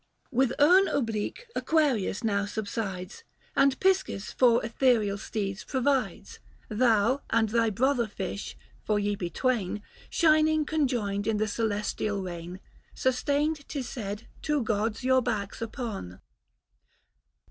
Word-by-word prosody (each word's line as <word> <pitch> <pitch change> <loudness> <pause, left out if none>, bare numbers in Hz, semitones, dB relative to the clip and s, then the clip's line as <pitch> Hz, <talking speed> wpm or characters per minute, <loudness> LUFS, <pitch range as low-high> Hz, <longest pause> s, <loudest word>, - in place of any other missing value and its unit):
With 260 -1 +2
urn 360 +7 +6
oblique 225 - -2
Aquarius 275 - +1
now 200 -2 +1
subsides, 200 - -4 0.3
And 275 -1 +3
Piscis 380 - +1
for 235 -3 +4
ethereal 225 -4 +2
steeds 200 -2 -3
provides: 265 -1 -1 0.3
Thou 230 +3 +3
and 225 -1 +2
thy 230 0 +2
brother 245 +3 +1
fish, 200 -1 -5 0.3
for 210 - +1
ye 205 0 0
be 175 -3 -4
twain, 210 -3 -1 0.3
Shining 310 -1 +3
conjoined 240 -10 0
in 220 -1 +1
the 215 +1 +1
celestial 210 -1 -1
reign, 175 0 -6 0.4
Sustained, 285 +4 0
'tis 270 -5 -4
said, 215 -2 -5
two 300 -4 0
gods 220 +1 -1
your 260 0 +4
backs 205 -3 -3
upon. 220 - -5
230 Hz, 120 wpm, -28 LUFS, 205-270 Hz, 0.4 s, urn